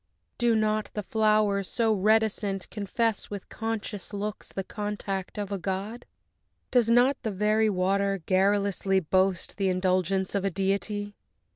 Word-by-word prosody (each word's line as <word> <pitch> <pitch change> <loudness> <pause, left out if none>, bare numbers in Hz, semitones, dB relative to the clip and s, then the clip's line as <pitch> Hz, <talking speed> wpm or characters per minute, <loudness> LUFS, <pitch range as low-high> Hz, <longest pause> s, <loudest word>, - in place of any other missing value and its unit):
Do 240 -2 +3
not 215 0 +1
the 210 - -2
flowers, 215 -2 +2
so 225 -2 +2
reticent, 210 -1 +1
confess 225 +1 -1
With 200 -2 -7
conscious 225 -2 -4
looks 205 +1 -5
the 195 - -3
contact 205 -2 -4
of 205 -1 -4
a 200 - -2
god? 195 +6 -4 0.6
Does 240 -3 +3
not 245 +4 +4
the 225 - -2
very 215 +2 +2
water 195 +1 +1
garrulously 195 0 +2
Boast 185 +1 0
the 195 -2 +1
indulgence 185 0 +1
of 200 -2 0
a 195 - +1
deity? 200 +2 -2
205 Hz, 140 wpm, -27 LUFS, 195-215 Hz, 0.6 s, not